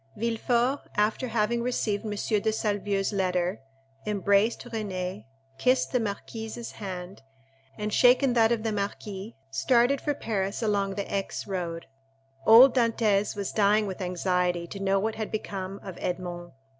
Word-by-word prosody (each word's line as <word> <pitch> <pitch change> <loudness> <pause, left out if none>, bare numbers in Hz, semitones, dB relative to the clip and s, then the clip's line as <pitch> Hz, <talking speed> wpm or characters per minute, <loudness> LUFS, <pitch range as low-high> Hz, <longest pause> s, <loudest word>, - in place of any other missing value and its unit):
Villefort, 235 +4 +1 0.2
after 215 +5 +1
having 230 +1 0
received 225 -4 -1
M. - - -3
de 210 +1 0
Salvieux's 205 -2 -1
letter, 180 -2 0 0.5
embraced 200 +2 +2
Renée, 200 -5 -4 0.3
kissed 255 +1 +2
the 250 - +2
marquise's 225 +2 -5
hand, 185 -2 -7 0.6
and 210 0 -3
shaken 250 +1 +5
that 230 -1 +4
of 230 -2 0
the 225 - 0
marquis, 200 0 -4 0.2
started 245 - +3
for 290 - -1
Paris 200 -2 -2
along 200 -2 0
the 200 - -2
Aix 195 -1 -2
road. 175 -4 -4 0.6
Old 245 +3 +9
Dantès 220 -5 +2
was 200 -2 -3
dying 210 0 +3
with 195 -1 -5
anxiety 180 -1 0
to 195 +3 -8
know 195 0 +2
what 220 +3 -1
had 220 -1 -4
become 195 -2 -5
of 190 -3 -8
Edmond. 175 -1 -4
205 Hz, 145 wpm, -27 LUFS, 195-225 Hz, 0.6 s, Old